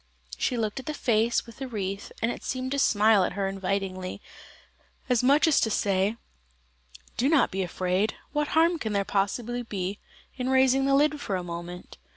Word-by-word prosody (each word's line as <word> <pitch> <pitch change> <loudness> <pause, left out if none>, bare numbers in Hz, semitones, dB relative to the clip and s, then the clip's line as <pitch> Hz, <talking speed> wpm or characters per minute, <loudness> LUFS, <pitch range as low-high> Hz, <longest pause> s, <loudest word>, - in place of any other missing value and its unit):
She 250 - -1
looked 220 +1 -2
at 265 - -10
the 305 - -3
face 235 -3 +1
with 230 -1 -13
the 270 - -5
wreath, 200 -4 -4
and 230 - +2
it - - -8
seemed 255 0 -3
to 280 - 0
smile 215 -4 +4
at - - -1
her 200 -1 -1
invitingly, 190 -1 -3 0.9
as 245 -2 +3
much 280 +5 +4
as 315 - +4
to 220 - +2
say: 200 0 +1 1.0
"Do 260 +4 +2
not 310 -4 +3
be 190 - -2
afraid, 185 +3 -1 0.2
what 295 0 0
harm 335 +1 +4
can 220 -6 -3
there 200 -1 +1
possibly 230 +5 -1
be 200 -3 -4 0.4
in 255 0 -2
raising 265 0 +4
the 275 0 +3
lid 295 +1 +2
for 200 - -2
a 180 - -2
moment?" 175 +1 -8
220 Hz, 190 wpm, -27 LUFS, 195-265 Hz, 1.0 s, smile